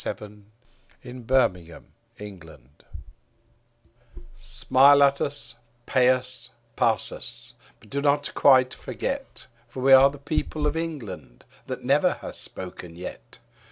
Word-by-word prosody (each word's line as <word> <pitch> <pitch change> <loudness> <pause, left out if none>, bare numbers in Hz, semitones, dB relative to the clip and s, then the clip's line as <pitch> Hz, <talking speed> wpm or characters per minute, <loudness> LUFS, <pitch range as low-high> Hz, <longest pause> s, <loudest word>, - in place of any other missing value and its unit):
K. - - -20
Chesterton 105 0 -8 0.5
The 125 - -10
Secret 115 -10 -1 0.3
People 95 - -12 1.8
SMILE 130 +4 +4
at 140 0 +2
us, 140 -4 -3 0.3
pay 125 -1 +3
us, 130 0 0 0.3
pass - - +1
us; - - -10 0.3
but 105 - -21
do 140 - -2
not 145 0 0
quite 130 -2 +4
forget. 275 0 -6 0.2
For 125 +2 -10
we 135 0 +6
are 135 +1 +8
the 145 - -11
people 150 +1 -3
of 150 +1 0
England, 150 - -7 0.2
that - - -6
never - - +2
have - - -9
spoken 90 -2 -2
yet. 90 +2 -10
130 Hz, 125 wpm, -24 LUFS, 105-140 Hz, 1.8 s, are